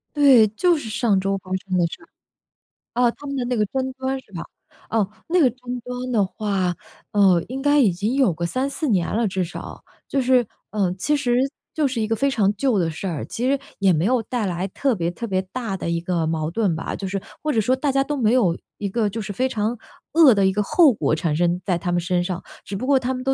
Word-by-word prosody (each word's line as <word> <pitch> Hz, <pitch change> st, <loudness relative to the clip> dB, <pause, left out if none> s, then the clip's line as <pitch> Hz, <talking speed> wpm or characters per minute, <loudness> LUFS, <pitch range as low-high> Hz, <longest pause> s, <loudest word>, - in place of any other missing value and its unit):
对， 270 Hz, -7 st, +7 dB
就 340 Hz, -, +2 dB
是 230 Hz, -7 st, -6 dB
上 215 Hz, -3 st, +2 dB
周 195 Hz, +1 st, 0 dB
发 185 Hz, -1 st, -13 dB
生 185 Hz, -1 st, -2 dB
的 175 Hz, -, +3 dB
事 -, -, -10 dB
儿。 330 Hz, -, -17 dB, 0.9 s
哦， 245 Hz, -1 st, +3 dB
她 290 Hz, -, -12 dB
们 280 Hz, -, -3 dB
的 255 Hz, -2 st, -1 dB
那 245 Hz, 0 st, -1 dB
个 210 Hz, -, +2 dB
争 260 Hz, +3 st, -2 dB
端 265 Hz, 0 st, -3 dB
是 205 Hz, -, -28 dB
吧？ 170 Hz, -3 st, -5 dB, 0.5 s
哦， 215 Hz, -3 st, +1 dB, 0.2 s
那 355 Hz, +2 st, +2 dB
个 260 Hz, -, +5 dB
争 250 Hz, +1 st, -6 dB
端 250 Hz, +1 st, -5 dB
的 210 Hz, -4 st, +3 dB
话， 190 Hz, -2 st, -1 dB, 0.4 s
嗯， 190 Hz, -5 st, +4 dB
应 265 Hz, +2 st, -5 dB
该 290 Hz, +1 st, +4 dB
已 230 Hz, -8 st, +5 dB
经 205 Hz, +9 st, -2 dB
有 255 Hz, -11 st, +3 dB
个 170 Hz, +2 st, -3 dB
3-4 270 Hz, -, -2 dB
年 185 Hz, -7 st, +1 dB
了， 230 Hz, -1 st, +2 dB
至 190 Hz, -1 st, -1 dB
少。 170 Hz, -, -8 dB, 0.2 s
就 275 Hz, -, 0 dB
是 250 Hz, -1 st, +3 dB, 0.3 s
嗯， 195 Hz, -4 st, 0 dB
其 295 Hz, +10 st, +1 dB
实， 245 Hz, -4 st, +1 dB, 0.4 s
就 305 Hz, -3 st, +1 dB
是 255 Hz, -3 st, -3 dB
一 215 Hz, -, 0 dB
个 225 Hz, -, +1 dB
非 275 Hz, +4 st, +1 dB
常 210 Hz, -7 st, +2 dB
旧 255 Hz, -3 st, +2 dB
的 170 Hz, -3 st, +1 dB
事 160 Hz, +5 st, -5 dB
儿， 165 Hz, -6 st, -3 dB
其 250 Hz, +3 st, -2 dB
实 280 Hz, -1 st, +2 dB, 0.2 s
也 195 Hz, -2 st, +4 dB
没 160 Hz, +4 st, +1 dB
有 250 Hz, 0 st, +2 dB
带 235 Hz, 0 st, -2 dB
来 180 Hz, 0 st, -2 dB
特 265 Hz, +6 st, 0 dB
别 170 Hz, -3 st, -1 dB
特 205 Hz, +7 st, -5 dB
别 190 Hz, -4 st, 0 dB
大 230 Hz, -6 st, -3 dB
的 170 Hz, -, -4 dB
一 170 Hz, 0 st, 0 dB
个 170 Hz, -2 st, -1 dB
矛 160 Hz, -1 st, -1 dB
盾 200 Hz, -3 st, +1 dB
吧， 160 Hz, -, -4 dB
就 195 Hz, -, -5 dB
是 190 Hz, 0 st, -3 dB, 0.2 s
或 305 Hz, -, 0 dB
者 225 Hz, -, +2 dB
说 255 Hz, +5 st, +2 dB
大 285 Hz, +1 st, 0 dB
家 270 Hz, 0 st, +2 dB
都 295 Hz, +1 st, -3 dB
没 230 Hz, -2 st, +2 dB
有 190 Hz, -10 st, +3 dB, 0.2 s
一 205 Hz, -, -3 dB
个 215 Hz, 0 st, 0 dB
就 225 Hz, +2 st, -4 dB
是 210 Hz, 0 st, -5 dB
非 255 Hz, +6 st, +1 dB
常 220 Hz, +2 st, -1 dB, 0.4 s
恶 310 Hz, -6 st, +7 dB
的 200 Hz, -2 st, +2 dB
一 190 Hz, -, +4 dB
个 210 Hz, +2 st, 0 dB
后 315 Hz, -, +5 dB
果 155 Hz, -5 st, 0 dB
产 160 Hz, -1 st, -1 dB
生 175 Hz, +2 st, +1 dB
在 180 Hz, -3 st, +1 dB
她 175 Hz, +1 st, -3 dB
们 175 Hz, -, +2 dB
身 180 Hz, 0 st, 0 dB
上。 180 Hz, 0 st, -4 dB, 0.2 s
只 200 Hz, -, -5 dB
不 205 Hz, -, -3 dB
过 275 Hz, -1 st, +4 dB
她 255 Hz, +1 st, -2 dB
们 255 Hz, 0 st, -5 dB
都 270 Hz, +1 st, +1 dB
215 Hz, 275 characters per minute, -22 LUFS, 185-260 Hz, 0.9 s, 对